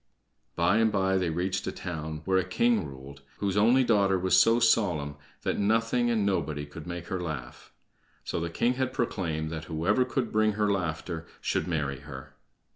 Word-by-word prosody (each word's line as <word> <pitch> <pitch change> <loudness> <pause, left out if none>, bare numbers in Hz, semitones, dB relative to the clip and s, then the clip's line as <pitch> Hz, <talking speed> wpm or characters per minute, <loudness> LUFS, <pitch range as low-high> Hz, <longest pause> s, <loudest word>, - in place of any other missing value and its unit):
By 90 +5 +3
and 110 -1 +3
by 95 -1 +2
they 90 -2 0
reached 95 +3 -2
a - - -1
town 80 -3 -6
where 95 -1 +3
a - - +1
king 105 -1 +1
ruled 70 0 -11 0.2
whose 100 -2 -1
only 120 +6 +5
daughter 100 -5 +3
was 95 0 +2
so 115 +6 +5
solemn 90 -11 +2 0.3
that - - -1
nothing 115 +3 +2
and 110 -3 +1
nobody 75 -7 -1
could 75 +3 -10
make 85 -1 -5
her 95 -3 -2
laugh. 80 -6 -6 0.5
So - - -3
the 85 0 -2
king 120 +9 +1
had 130 0 -1
proclaimed 80 -10 -2
that 80 0 -5
whoever 90 +10 +1
could 125 -2 -2
bring 110 0 +2
her 105 0 +1
laughter 80 -2 -3
should - - -1
marry 75 -6 -2
her. 65 -2 -10
95 Hz, 185 wpm, -28 LUFS, 80-110 Hz, 0.5 s, only